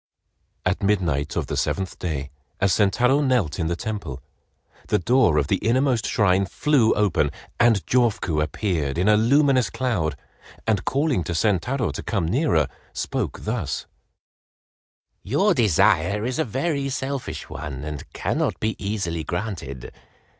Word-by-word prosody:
At - - 0
midnight 85 -8 0
of - - -1
the - - -4
seventh 95 -1 -2
day, 70 -5 -3 0.3
as 95 -1 +3
Sentaro 125 +7 +3
knelt 125 - +1
in 80 - 0
the 85 - -1
temple, 90 -9 -5 0.7
the - - +2
door 120 - +3
of 75 - +3
the 95 +7 +1
innermost 120 +2 +1
shrine 95 -2 +2
flew 130 -1 +2
open, 100 -8 +2 0.3
and 115 -4 +4
Jofuku 105 -10 +1
appeared 80 -4 -1
in 90 +4 +1
a 105 - +6
luminous 130 +3 +3
cloud, 95 - -1 0.5
and 105 -4 0
calling 140 - +1
to 85 - -3
Sentaro 110 +8 +1
to - - -5
come 100 -7 -1
nearer, 110 - +2 0.3
spoke - - -3
thus: 105 - -2 1.4
"Your 155 - +2
desire 105 - +3
is 130 +4 -2
a 160 - +2
very 140 +3 -1
selfish 135 0 -4
one 70 -2 -6
and 75 -1 -7
cannot - - -1
be 110 +1 -1
easily 95 -6 -2
granted. 85 - -5
105 Hz, 140 wpm, -23 LUFS, 85-125 Hz, 1.4 s, a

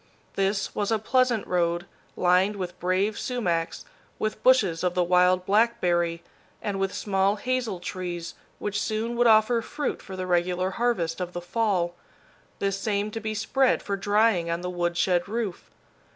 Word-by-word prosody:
This 195 +1 0
was 205 +1 -1
a 225 - +3
pleasant 240 0 +1
road, 175 0 0 0.3
lined 185 +3 +3
with 180 -2 -6
brave 190 +4 0
sumacs, 175 -10 -2 0.3
with 215 - -3
bushes 200 -11 +4
of 180 -1 0
the 180 - +3
wild 180 +1 +3
blackberry, 180 -6 +2 0.4
and 200 -2 -3
with 195 0 0
small 195 0 +1
hazel 235 -3 -2
trees 175 -1 -5 0.2
which 205 -1 -2
soon 225 +2 -2
would 240 0 +3
offer 225 +1 +5
fruit 290 +5 -3
for 190 - -9
the 185 0 -4
regular 180 +1 +1
harvest 190 -7 -1
of 180 0 -4
the 175 - -3
fall, 175 -2 0 0.6
this 195 0 -1
same 205 0 -1
to 225 - -4
be 215 0 -4
spread 250 +5 +1
for 200 - -2
drying 205 -3 +2
on 170 +1 -1
the 180 0 -4
woodshed 175 +1 0
roof. 215 -4 -4
195 Hz, 160 wpm, -26 LUFS, 180-220 Hz, 0.6 s, offer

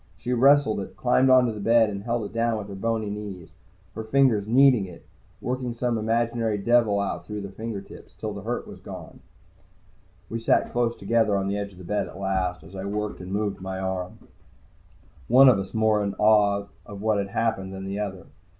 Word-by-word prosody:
She 125 - -3
wrestled 135 -2 +4
it, 95 - -8
climbed 130 +1 +3
onto 130 -2 +5
the 105 - -7
bed, 115 +1 +4
and 100 -1 -5
held 115 0 -2
it 100 - -8
down 115 0 +1
with 105 -1 -6
her - - -7
boney 110 +1 -2
knees. 100 -4 -7 0.4
Her 110 - -5
fingers 110 -3 +2
kneaded 125 -4 +5
it, 90 - -13 0.4
working 125 -1 -3
some 120 0 -1
imaginary 115 0 0
devil 110 -1 +3
out 90 -3 -3
through 105 -1 -5
the 100 -1 -7
fingertips, 105 -1 -8
till - - -5
the - - -7
hurt - - -4
was - - -11
gone. - - -10 1.1
We 115 - -4
sat 115 - +2
close 120 -1 0
together 110 -3 +1
on 95 0 -1
the 100 - -1
edge 100 0 -5
of - - -17
the 95 - -11
bed 105 +4 -1
at - - -11
last, 95 -2 -1
as 95 0 -13
I 95 0 -5
worked 105 0 -3
and 90 +1 -8
moved 100 -1 -2
my 95 0 -5
arm, 95 -1 -4 1.1
one 130 +3 +7
of 125 -6 +6
us 95 -1 -5
more 110 -1 +2
in 100 -1 -3
awe 105 -1 +3 0.2
of 100 -3 -10
what 110 -2 +2
had 100 - -2
happened 100 -2 -1
than 95 0 -7
the 100 +1 -4
other. 95 -3 -5
105 Hz, 205 wpm, -25 LUFS, 100-115 Hz, 1.1 s, one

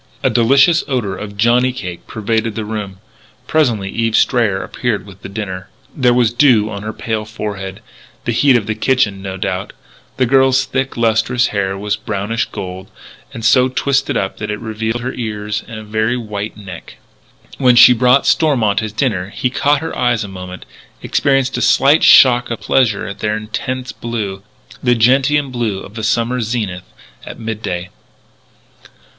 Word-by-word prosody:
A - - +2
delicious 135 +9 +4
odour 120 -8 -2
of 100 +1 -8
johnny 120 +4 +3
cake 90 -8 -7
pervaded 110 +1 -2
the 110 -2 -3
room. 105 -3 -5 0.5
Presently 120 -11 +1
Eve 115 -1 0
Strayer 105 -7 +2
appeared 105 0 -3
with 100 -2 -14
the - - -8
dinner. 95 -3 -6 0.3
There 125 -3 +3
was 120 -2 +2
dew 120 -5 +4
on 100 -1 -6
her 110 +1 -4
pale 110 -1 -3
forehead 100 -3 -6 0.4
the 120 - 0
heat 130 +2 +4
of 110 - -3
the 110 - -1
kitchen, 110 -4 0
no 95 -1 -6
doubt. 95 0 -3 0.4
The 130 - +3
girl's 130 +1 +3
thick, 135 0 -3
lustrous 115 +2 +1
hair 95 -2 -2
was 105 +1 -2
brownish 110 +1 -2
gold, 95 -1 -8 0.4
and 115 -1 -7
so 125 +2 +4
twisted 135 0 0
up 95 - -3
that 105 - -4
it 105 0 -3
revealed 110 +1 -3
her 125 +2 -4
ears 105 -2 -4
and 115 - -8
a - - -9
very 110 +3 -1
white 105 -2 -5
neck. 95 -5 -10 0.6
When 125 -3 +5
she 125 +1 +9
brought 125 +3 +3
Stormont 125 - +2
his 110 -1 -4
dinner 110 -7 -1
he 125 +4 -2
caught 145 +2 +1
her 160 - -5
eyes 120 -3 +1
a - - -6
moment 90 -1 -9 0.4
experienced 135 -1 +1
a - - -3
slight 145 +4 +4
shock 120 -2 +6
of 115 - -4
pleasure 115 -6 +1
at 100 - -7
their 105 0 -1
intense 125 +4 -4
blue 105 -5 -5 0.4
the 125 -1 +3
gentian 135 +4 +2
blue 115 -6 -2
of 100 - -11
the 110 - -6
summer 120 +3 0
zenith 105 -6 -4 0.3
at - - -9
midday. 100 -5 -4
110 Hz, 170 wpm, -17 LUFS, 105-125 Hz, 0.6 s, she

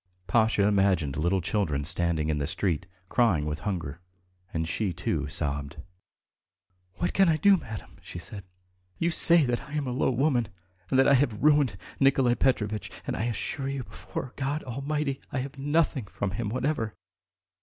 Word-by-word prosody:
Pasha 110 -2 +2
imagined 95 -8 +2
little 90 +4 +1
children 80 -6 -1
standing 80 -1 0
in 75 -1 0
the 70 - -2
street, 90 0 -1 0.2
crying 95 -10 +2
with 75 0 -3
hunger, 85 -7 -4 0.5
and 80 0 -2
she, 95 +3 -1
too, 80 -3 -2
sobbed. 70 +1 -3 1.2
"What 175 - -2
can 195 -3 +4
I 160 - +3
do, 200 +6 +5
madam?" 110 - -8
she - - -9
said. 95 +4 -7 0.5
"You 170 +1 0
say 170 -1 +9
that 120 -1 -1
I 150 - -12
am 150 -2 -1
a 125 - -3
low 125 - +1
woman 130 -2 +1 0.4
and 130 - +2
that 135 - +5
I - - +6
have 125 -5 +1
ruined 145 -9 +3 0.2
Nikolay 135 -3 +4
Petrovitch, 110 -5 0 0.2
and - - -3
I 110 - -2
assure 130 +4 -3
you... 135 -2 -3
before 130 +2 -7
God 140 +3 -2
Almighty, 140 +2 -3
I - - -3
have 130 +1 -4
had 135 - -10
nothing 145 -4 +1
from 100 - -3
him 105 +2 -3
whatever. 125 -2 -2
115 Hz, 175 wpm, -27 LUFS, 85-140 Hz, 1.2 s, say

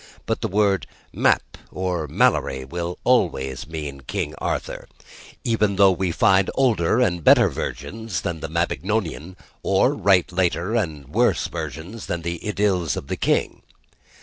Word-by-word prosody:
But 110 - -2
the 115 - 0
word 100 -1 +1 0.3
"Mappe" - - +1
or 90 -4 -2
"Malory" 65 -1 +1
will 85 +4 -4
always 70 - +1
mean 75 -4 -6
King 65 - -3
Arthur; - - -3 0.6
even 110 -4 +1
though 100 0 +6
we 90 -1 -1
find 95 +2 +3
older 115 -6 +2
and 90 -9 +1
better - - +6
origins 110 +2 -4
than 85 -2 -3
the 80 - -5
Mabinogian; 85 +1 -2 0.3
or - - +2
write 95 -4 +3
later 90 +2 0
and 80 - -2
worse - - +2
versions 95 +8 -6
than 85 -1 -3
the 85 0 -3
"Idylls 100 -5 0
of 70 - -7
the - - -1
King." - - 0
90 Hz, 145 wpm, -23 LUFS, 80-105 Hz, 0.6 s, though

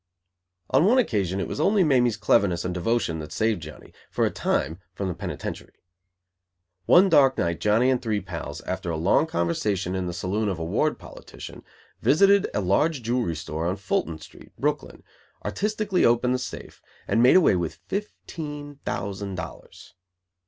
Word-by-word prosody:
On 165 - +4
one 235 +6 +4
occasion 100 - +1
it 95 - -2
was - - -5
only 195 +5 +3
Mamie's 125 -7 +3
cleverness 90 -5 +2
and 90 - -2
devotion 90 -2 -1
that 75 0 -8
saved 110 -5 0
Johnny, 75 -1 -11 0.2
for - - +1
a - - 0
time, 80 +3 -1 0.2
from 100 - -3
the - - -2
penitentiary. - - -6 1.1
One 185 +3 +7
dark 140 -6 +5
night 85 -1 -1
Johnny 110 +7 +3
and 125 - 0
three 110 -4 -1
pals, 85 -6 -7
after 90 - -4
a 80 - -2
long 95 - +3
conversation 90 - -1
in 95 -1 -2
the - - -2
saloon 100 +5 -1
of 95 - -2
a 80 - -4
ward 120 - 0
politician, - - -11 0.4
visited 195 +5 +4
a - - -1
large 125 - +1
jewelry 115 -7 0
store 80 +1 -4
on 90 - 0
Fulton 95 -5 -2
Street, 75 - -15
Brooklyn, - - -2 0.4
artistically 210 -2 0
opened 120 +2 +3
the 130 - 0
safe, 125 - -8 0.3
and 115 - +2
made 125 - +6
away 185 - +5
with 85 -2 -3
fifteen 150 -7 -6
thousand 100 0 -4
dollars. 90 - -9
105 Hz, 165 wpm, -25 LUFS, 90-145 Hz, 1.1 s, One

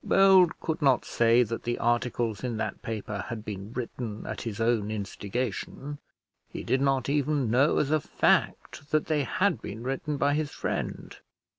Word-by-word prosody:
Bold 190 -3 +5
could 160 0 -3
not 135 -4 +3
say 120 +1 +4
that 115 0 -4
the 120 0 -2
articles 120 -2 0
in 120 -3 -2
that - - -3
paper 105 -2 -4
had 110 -2 -6
been 100 0 -6
written 115 -3 -5
at - - -5
his 115 -2 -5
own 115 -2 +1
instigation. 110 +7 -4 0.5
He - - -6
did 130 +1 +1
not 135 -2 +1
even 140 -3 +1
know, 135 +5 +4
as 145 - +1
a 155 - +4
fact, 145 +1 0
that 155 -1 +2
they 150 -2 +1
had 190 +3 +1
been 110 +3 -7
written 135 +3 -2
by 145 +1 +2
his 150 0 0
friend. - - -4
125 Hz, 170 wpm, -28 LUFS, 115-145 Hz, 0.5 s, Bold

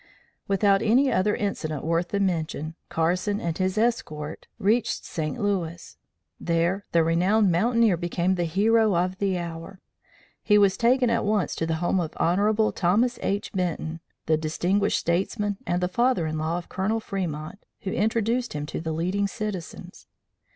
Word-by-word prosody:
Without 195 0 +3
any 260 +5 +3
other 205 +3 +2
incident 155 -8 -3
worth 165 +2 0
the 200 - -2
mention, 160 -4 -1 0.2
Carson 180 +5 0
and 170 -1 -2
his 185 +2 0
escort 160 -10 -2
reached 225 +3 +1
St. 155 -4 -4
Louis. 175 -5 -2 0.4
There 170 +4 0
the 165 -1 +4
renowned 185 +5 +3
mountaineer 225 +2 +3
became 175 +1 0
the 175 -2 0
hero 210 +4 +3
of 180 +2 0
the 195 -2 0
hour. 170 +2 -7 0.6
He 210 - +4
was 200 -2 +4
taken 245 0 +3
at 230 0 +1
once 205 -3 0
to 165 - -2
the 165 - 0
home 190 - +2
of 165 -2 -4
Hon. 210 +5 +2
Thomas 220 +8 +1
H. 200 +1 -2
Benton, 170 -3 -2 0.3
the 160 -1 +2
distinguished 180 +6 0
statesman 195 +4 -1
and 175 0 0
the - - +2
father 235 -2 +1
in 155 0 -2
law 160 +2 -1
of 175 - -7
Colonel 210 +4 -1
Fremont, 180 -5 -4 0.2
who 195 - -3
introduced 230 +4 0
him 150 -1 -3
to 150 - -5
the 160 -1 -3
leading 185 +5 0
Citizens. 205 -5 -6
185 Hz, 160 wpm, -25 LUFS, 165-210 Hz, 0.6 s, the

